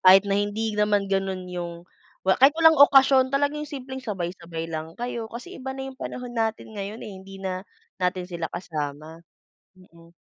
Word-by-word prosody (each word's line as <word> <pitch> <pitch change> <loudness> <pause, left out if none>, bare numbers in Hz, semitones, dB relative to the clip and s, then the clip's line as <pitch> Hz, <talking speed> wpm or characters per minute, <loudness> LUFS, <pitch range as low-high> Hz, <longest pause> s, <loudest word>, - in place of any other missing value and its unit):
kahit 190 +1 +8
na 200 - -1
hindi 215 +2 -1
naman 210 -1 +2
ganon 195 -1 -1
yung 170 -1 -5 0.4
kahit 265 +11 +5
walang 320 -1 +7
okasyon 270 -2 +7
talaga 280 +1 +1
yung 300 - -5
simpleng 265 -2 -6
sabay-sabay 175 -5 -4
lang 160 0 -5
kayo. 235 -2 -4
Kasi 250 +11 -8
iba 265 0 -5
na 265 0 -5
yung 265 - -10
panahon 250 -1 -6
natin 225 -1 -2
ngayon 205 +3 -5
eh, 210 - -7
hindi 195 +1 -11
na 185 -1 -3 0.4
natin 180 0 0
sila 170 -2 -3
kasama. 155 -2 -5 0.6
Mhm. 170 -2 -19
200 Hz, 170 wpm, -25 LUFS, 175-255 Hz, 0.6 s, kahit